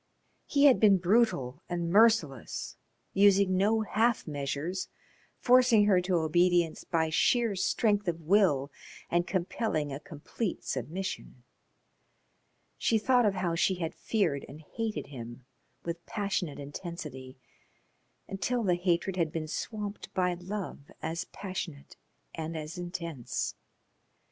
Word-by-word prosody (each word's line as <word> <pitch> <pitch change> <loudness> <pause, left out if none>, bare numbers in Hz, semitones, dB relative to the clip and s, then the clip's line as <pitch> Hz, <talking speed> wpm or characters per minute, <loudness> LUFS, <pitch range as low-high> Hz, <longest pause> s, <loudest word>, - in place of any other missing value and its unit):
He 285 0 +3
had 270 -3 +7
been 205 -3 +6
brutal 180 - +1
and 170 -1 -2
merciless, 200 - +2 0.4
using 200 -1 +5
no 210 +4 +3
half 220 +2 +1
measures, 145 +5 -3 0.5
forcing 245 -4 +5
her 190 -3 +4
to 180 0 0
obedience 170 +1 +2
by 160 -2 0
sheer 230 +5 +2
strength 205 +1 +1
of 170 -1 -1
will 155 -6 +3 0.4
and 175 +1 +2
compelling 170 -5 -1
a 135 - -5
complete 180 +5 -5
submission. 170 -7 -5 1.4
She 225 - +3
thought 245 +1 +3
of 200 - +1
how 180 -2 -1
she 180 +3 +2
had 170 -2 -3
feared 195 -11 0
and 150 +3 -10
hated 220 +6 -4
him 120 -2 -9 0.4
with 170 0 -4
passionate 200 -7 -2
intensity, 140 -3 -7 0.9
until 235 +5 -1
the 185 -4 +3
hatred 180 +1 0
had 165 -3 +1
been 160 -1 -3
swamped 205 +4 -5
by 180 -1 +2
love 180 -4 -6
as 165 +1 -3
passionate 185 -7 -7 0.4
and 160 0 -4
as 155 +1 -6
intense. 170 -7 -4
180 Hz, 125 wpm, -30 LUFS, 155-205 Hz, 1.4 s, had